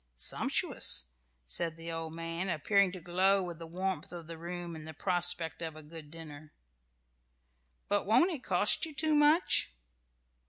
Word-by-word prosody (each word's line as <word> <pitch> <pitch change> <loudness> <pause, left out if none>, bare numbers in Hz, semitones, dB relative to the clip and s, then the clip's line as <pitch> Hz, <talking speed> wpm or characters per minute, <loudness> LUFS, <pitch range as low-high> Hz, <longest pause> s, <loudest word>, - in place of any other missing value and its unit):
"Sumptuous!" - - +3 0.3
said 165 - -1
the 165 0 -5
old 165 -1 -4
man, 165 +3 -3
appearing 190 +4 +2
to 185 - -8
glow 185 +3 +2
with 175 -2 -7
the 165 - -7
warmth 185 -1 -3
of 170 -2 -8
the 165 +1 -7
room 175 0 -6
and 155 0 -9
the 160 - -8
prospect 175 -1 0
of 160 -2 -5
a 155 - -11
good 155 0 -11
dinner. 155 -2 -11 1.3
"But 205 -1 0
won't 335 - +4
it 300 -7 -5
cost - - +1
you 310 - -11
too 310 +2 +2
much?" 295 - +4
170 Hz, 160 wpm, -31 LUFS, 160-190 Hz, 1.3 s, won't